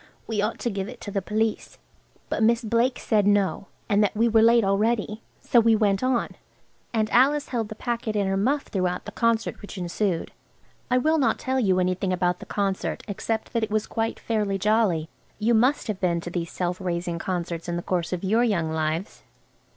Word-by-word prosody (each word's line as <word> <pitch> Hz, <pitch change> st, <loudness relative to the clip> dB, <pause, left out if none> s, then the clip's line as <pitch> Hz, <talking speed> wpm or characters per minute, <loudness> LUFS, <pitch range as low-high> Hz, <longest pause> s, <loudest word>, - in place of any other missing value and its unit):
We 220 Hz, -2 st, -1 dB
ought 210 Hz, +2 st, -1 dB
to 240 Hz, -, -1 dB
give 195 Hz, 0 st, -3 dB
it 250 Hz, -, -10 dB
to 205 Hz, -, -6 dB
the 195 Hz, -, -1 dB
police." 215 Hz, +3 st, -2 dB, 0.5 s
But -, -, -2 dB
Miss 235 Hz, +2 st, +3 dB
Blake 235 Hz, +3 st, +1 dB
said 210 Hz, -3 st, +1 dB
no, 200 Hz, -1 st, +1 dB, 0.2 s
and 205 Hz, -1 st, +3 dB
that 210 Hz, -, 0 dB
we 230 Hz, +2 st, +4 dB
were 225 Hz, -1 st, +4 dB
late 230 Hz, +1 st, +5 dB
already, 210 Hz, +2 st, 0 dB, 0.2 s
so 240 Hz, -, +4 dB
we 230 Hz, -1 st, +4 dB
went 205 Hz, -3 st, +2 dB
on, 255 Hz, -2 st, +1 dB, 0.6 s
and 220 Hz, -2 st, +1 dB
Alice 285 Hz, +4 st, +3 dB
held 230 Hz, -4 st, -2 dB
the 215 Hz, -, -7 dB
packet 230 Hz, -1 st, -3 dB
in 205 Hz, -1 st, +1 dB
her 195 Hz, 0 st, 0 dB
muff 265 Hz, +9 st, +1 dB
throughout 185 Hz, -2 st, -2 dB
the -, -, -6 dB
concert 230 Hz, -1 st, 0 dB
which 205 Hz, -, -9 dB
ensued. 180 Hz, 0 st, -2 dB, 0.6 s
I 250 Hz, -, +3 dB
will 315 Hz, +5 st, +2 dB
not 270 Hz, -, +2 dB
tell 260 Hz, 0 st, -1 dB
you 190 Hz, -6 st, +2 dB
anything 185 Hz, +1 st, 0 dB
about 180 Hz, 0 st, 0 dB
the -, -, -10 dB
concert 195 Hz, -2 st, -2 dB
except 220 Hz, +2 st, -3 dB
that 230 Hz, -, +1 dB
it 220 Hz, -, -1 dB
was 215 Hz, 0 st, 0 dB
quite 225 Hz, 0 st, -2 dB
fairly 210 Hz, -3 st, -1 dB
jolly–you 210 Hz, +1 st, 0 dB
must 250 Hz, +6 st, +3 dB
have 210 Hz, -3 st, -3 dB
been 175 Hz, -2 st, +1 dB
to 175 Hz, -, -7 dB
these 170 Hz, -2 st, -3 dB
Self 180 Hz, +1 st, -3 dB
Raising 175 Hz, -1 st, -2 dB
Concerts 175 Hz, -2 st, -3 dB
in 170 Hz, -, -1 dB
the 175 Hz, -, -3 dB
course 175 Hz, -2 st, -1 dB
of 180 Hz, 0 st, -3 dB
your 220 Hz, +5 st, +3 dB
young 170 Hz, -9 st, 0 dB
lives. 160 Hz, +4 st, -2 dB
210 Hz, 205 wpm, -25 LUFS, 185-230 Hz, 0.6 s, late